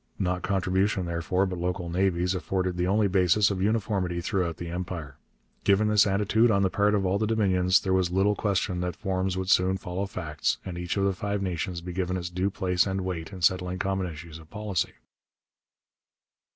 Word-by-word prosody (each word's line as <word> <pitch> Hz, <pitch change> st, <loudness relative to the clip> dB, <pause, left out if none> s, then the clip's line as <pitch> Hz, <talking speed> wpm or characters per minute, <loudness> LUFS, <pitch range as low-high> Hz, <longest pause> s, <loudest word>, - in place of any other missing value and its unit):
Not 90 Hz, -1 st, -1 dB
contribution 95 Hz, +1 st, 0 dB
therefore, 85 Hz, +3 st, 0 dB
but 90 Hz, -2 st, -4 dB
local 90 Hz, 0 st, -2 dB
navies, 90 Hz, 0 st, +1 dB
afforded 95 Hz, -1 st, -1 dB
the 90 Hz, 0 st, 0 dB
only 105 Hz, +2 st, +3 dB
basis 95 Hz, +2 st, +3 dB
of 95 Hz, -2 st, -2 dB
uniformity 100 Hz, -4 st, 0 dB
throughout 85 Hz, -2 st, -1 dB
the 85 Hz, -, -6 dB
Empire. 85 Hz, -5 st, -5 dB, 0.5 s
Given 100 Hz, +2 st, +3 dB
this 105 Hz, -1 st, +5 dB
attitude 105 Hz, +4 st, +3 dB
on 100 Hz, -2 st, +3 dB
the 95 Hz, -, +1 dB
part 105 Hz, +1 st, +2 dB
of 100 Hz, -2 st, 0 dB
all 95 Hz, +2 st, +1 dB
the 110 Hz, -, 0 dB
Dominions, 95 Hz, -4 st, +3 dB
there 95 Hz, -, 0 dB
was 95 Hz, -2 st, +2 dB
little 95 Hz, +3 st, +2 dB
question 100 Hz, -3 st, -1 dB
that 90 Hz, -1 st, -2 dB
forms 95 Hz, -2 st, -2 dB
would 95 Hz, 0 st, -1 dB
soon 95 Hz, +1 st, +3 dB
follow 90 Hz, +2 st, -4 dB
facts, 80 Hz, -6 st, -2 dB
and 90 Hz, -, -5 dB
each 90 Hz, +2 st, -3 dB
of 100 Hz, -, +2 dB
the 100 Hz, -, +2 dB
Five 100 Hz, +1 st, -2 dB
Nations 90 Hz, -1 st, -3 dB
be 90 Hz, +1 st, -6 dB
given 95 Hz, 0 st, -1 dB
its 90 Hz, -1 st, -4 dB
due 90 Hz, +2 st, 0 dB
place 95 Hz, -2 st, +1 dB
and 95 Hz, 0 st, -1 dB
weight 90 Hz, -2 st, -4 dB
in 95 Hz, -3 st, -8 dB
settling 90 Hz, +1 st, +2 dB
common 95 Hz, 0 st, -1 dB
issues 80 Hz, +1 st, -9 dB
of 80 Hz, -1 st, -16 dB
policy. 105 Hz, -5 st, -2 dB
95 Hz, 195 wpm, -27 LUFS, 90-100 Hz, 0.5 s, this